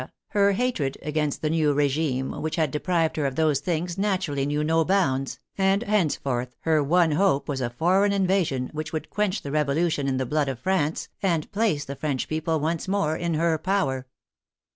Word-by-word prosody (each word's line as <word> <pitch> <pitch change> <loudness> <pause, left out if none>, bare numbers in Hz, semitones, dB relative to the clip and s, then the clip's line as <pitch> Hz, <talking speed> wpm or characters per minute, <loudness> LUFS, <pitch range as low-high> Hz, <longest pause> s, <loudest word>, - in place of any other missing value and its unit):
her 200 -1 +3
hatred 195 - -1
against 150 -1 -1
the 155 - +1
new 155 -3 +2
regime 140 -2 0
which 155 0 -2
had 155 -5 +1
deprived 165 +2 0
her 145 -2 +1
of 135 - -4
those 155 -2 +2
things 175 +1 -2
naturally 185 -9 0
knew 150 +1 0
no 160 +1 +2
bounds, 140 -8 0 0.2
and 195 +3 +3
henceforth 140 - 0
her 160 -2 +2
one 165 +2 +3
hope 150 -2 +2
was 135 -2 -2
a 120 - -1
foreign 185 +11 +2
in 195 -1 +1
vasion, 160 -10 0
which 155 +1 -4
would 155 -2 -5
quench 210 -1 -1
the 140 - -5
Revolution 150 0 +1
in 130 -1 0
the 130 - -1
blood 145 +2 0
of 130 - -3
France, 160 0 -1
and 170 -6 0
place 200 -9 0
the 140 - -6
French 140 -2 -2
people 160 0 -1
once 160 +3 -2
more 185 -6 +1
in 170 -1 -1
her 160 0 +1
power. 140 -8 -1
155 Hz, 190 wpm, -25 LUFS, 140-180 Hz, 0.2 s, her